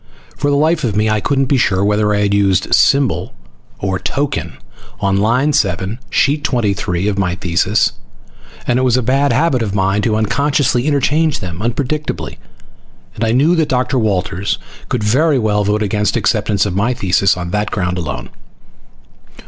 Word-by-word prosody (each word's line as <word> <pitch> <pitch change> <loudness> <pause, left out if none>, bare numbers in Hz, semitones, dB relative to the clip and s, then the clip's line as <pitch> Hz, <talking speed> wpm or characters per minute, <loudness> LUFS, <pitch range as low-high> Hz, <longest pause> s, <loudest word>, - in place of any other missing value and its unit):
For 145 - -1
the 140 - +2
life 155 +2 +1
of 110 -5 -1
me 105 +1 +1
I 105 -1 0
couldn't 135 +6 +1
be 135 +1 +1
sure 100 -5 +1
whether 105 0 +1
I 105 0 +1
had 100 -1 +1
used 95 -2 +1
symbol 135 - +2 0.4
or 95 -2 -2
token 115 - -3 0.4
on 100 0 +1
line 125 +8 +2
7, 100 +1 -1
sheet 145 +1 +1
23, 100 - -1
of 100 -1 -1
my 90 -3 0
thesis, 90 -2 +1 0.7
and 120 - +1
it - - +1
was 130 -1 +2
a 130 - 0
bad 135 +4 +2
habit 150 -6 +1
of 105 -3 -2
mine 95 +1 +1
to 110 0 0
unconsciously 130 +3 +1
interchange 150 +2 +1
them 90 -2 -6
unpredictably, 140 +6 -3 0.7
and 110 - -4
I 110 - +1
knew 145 +8 +3
that 160 -2 +1
Dr. 130 +1 0
Walters 100 -3 -1 0.3
could 120 -4 -1
very 140 +8 +2
well 105 -3 +1
vote 105 +2 0
against 105 -1 0
acceptance 100 -1 +1
of 100 -3 -3
my 110 +6 0
thesis 95 -1 +2
on 90 -1 -5
that 105 +1 -1
ground 90 -2 -2
alone. 70 -8 -5
110 Hz, 175 wpm, -16 LUFS, 100-135 Hz, 0.7 s, knew